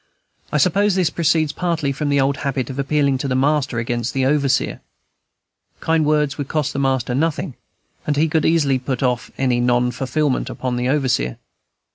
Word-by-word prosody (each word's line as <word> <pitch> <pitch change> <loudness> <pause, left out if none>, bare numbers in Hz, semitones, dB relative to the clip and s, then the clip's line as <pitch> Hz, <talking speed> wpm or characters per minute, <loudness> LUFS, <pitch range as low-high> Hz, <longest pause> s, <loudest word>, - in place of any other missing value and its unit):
I 150 - +1
suppose 195 +6 +2
this 180 -4 +1
proceeds 160 -2 +1
partly 165 -4 -1
from 145 +2 -2
the 140 0 +2
old 135 +1 +1
habit 135 -3 -2
of 130 - -7
appealing 140 -1 +1
to 140 - -2
the 130 - -1
master 135 -2 +1
against 120 +1 -2
the 135 -1 +1
overseer. 140 -1 +1 1.0
Kind 160 -1 +1
words 150 -2 +1
would 140 - -3
cost 150 0 -1
the 140 - -2
master 130 -3 0
nothing, 160 +2 -1 0.5
and 145 -1 0
he 155 +2 +3
could 160 -1 +1
easily 145 -5 +2
put 130 0 -3
off 125 -2 0
any 125 -2 +1
non 120 0 +2
fulfilment 135 +2 -1
upon 125 -1 -3
the 125 +1 -1
overseer. 130 - 0
140 Hz, 180 wpm, -20 LUFS, 130-150 Hz, 1.0 s, he